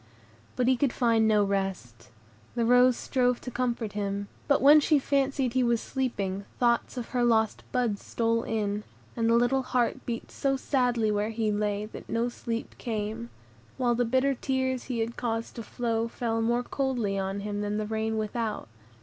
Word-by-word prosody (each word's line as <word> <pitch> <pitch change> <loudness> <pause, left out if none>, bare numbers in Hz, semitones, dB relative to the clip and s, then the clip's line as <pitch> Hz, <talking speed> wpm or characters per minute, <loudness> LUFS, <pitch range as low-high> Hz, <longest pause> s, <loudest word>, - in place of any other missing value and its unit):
But 250 - +1
he 260 -1 +4
could 270 -1 +1
find 230 -3 +3
no 210 -1 +4
rest. 190 - -3 0.5
The 235 -1 +1
rose 250 +1 +5
strove 250 -2 +1
to 250 - -6
comfort 235 -3 -2
him; 200 -1 -3 0.2
but 280 - +4
when 290 +3 +8
she 300 +1 +3
fancied 275 -2 0
he 260 - +2
was 235 -2 +2
sleeping, 200 -8 -2
thoughts 240 +1 +1
of 240 - -4
her 245 -1 0
lost 220 -2 +2
bud 235 -5 0
stole 230 0 0
in, 210 -2 -2 0.3
and 230 -1 +1
the 230 - +5
little 245 +3 +3
heart 250 -2 0
beat 230 -1 -4
so 270 -1 0
sadly 245 -5 +1
where 210 +1 0
he 220 -1 0
lay, 205 0 -1
that 215 - -11
no 230 +1 0
sleep 235 -1 -5
came; 220 +1 -3 0.5
while 245 -2 +2
the 240 +1 +1
bitter 260 +4 +2
tears 260 0 -1
he 245 -3 -2
had 230 +1 -3
caused 225 -1 -2
to - - -3
flow 230 0 -1
fell 230 -1 -2
more 240 +2 +1
coldly 245 -7 -1
on 195 +1 -2
him 205 0 -3
than 205 0 -1
the 215 - -1
rain 220 +1 -1
without. 215 - -2
230 Hz, 185 wpm, -28 LUFS, 215-250 Hz, 0.5 s, when